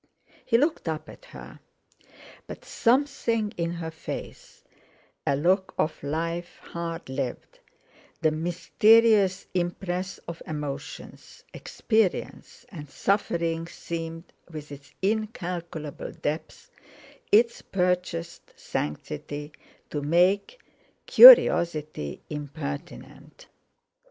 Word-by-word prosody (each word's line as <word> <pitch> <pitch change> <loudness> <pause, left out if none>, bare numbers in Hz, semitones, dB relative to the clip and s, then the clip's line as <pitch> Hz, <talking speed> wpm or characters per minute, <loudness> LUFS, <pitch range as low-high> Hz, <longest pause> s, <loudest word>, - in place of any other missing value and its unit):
He 230 - +3
looked 295 - 0
up 155 -1 -4
at - - -14
her. - - -12 0.9
But - - -10
something 235 -4 +1
in 170 0 -2
her 165 -1 -5
face—a 160 -3 -8
look 185 +6 +1
of 155 - -1
life 165 +4 -3
hard 170 0 -6
lived, 130 -2 -5 0.6
the 160 -2 +3
mysterious 195 +5 +3
impress 180 +1 -3
of 170 -1 -7
emotions, 150 -1 -7
experience, 220 -5 -2
and 150 -7 -10
suffering 165 -2 -1
seemed, 165 0 -7 0.2
with 155 -3 -9
its 140 -1 -11
incalculable 180 -8 -3
depth, 150 +2 -5 0.6
its 235 +2 +4
purchased 180 -2 -3
sanctity, 145 - -5 0.4
to 145 - -2
make 180 - +2 0.5
curiosity 170 - +7
impertinent. 145 - -8
170 Hz, 85 wpm, -26 LUFS, 155-195 Hz, 0.9 s, curiosity